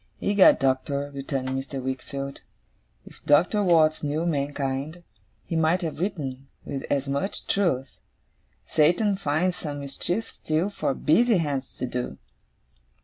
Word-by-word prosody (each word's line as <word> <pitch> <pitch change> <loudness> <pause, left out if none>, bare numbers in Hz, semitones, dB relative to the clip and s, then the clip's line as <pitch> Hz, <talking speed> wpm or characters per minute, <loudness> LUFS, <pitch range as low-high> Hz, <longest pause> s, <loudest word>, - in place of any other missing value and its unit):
'Egad, 200 -2 +6
Doctor,' 140 +2 0
returned 135 -1 -3
Mr. 135 +1 -3
Wickfield, 135 +1 -5 0.6
'if - - -15
Doctor 175 +8 +4
Watts 160 -5 +4
knew 150 +3 -1
mankind, 145 +1 -2 0.4
he 165 - -4
might 165 +3 +2
have 160 -2 -4
written, 140 -8 -3 0.2
with 135 -1 -4
as 140 -1 0
much 140 +8 -2
truth, 135 -10 0 0.7
"Satan 180 +7 +3
finds 180 0 0
some 145 -2 -5
mischief 175 +10 -3
still, 160 +6 -1
for 140 -8 -1
busy 225 +7 +4
hands 145 -5 -2
to - - -2
do." 125 0 -4
145 Hz, 130 wpm, -26 LUFS, 135-175 Hz, 0.7 s, Egad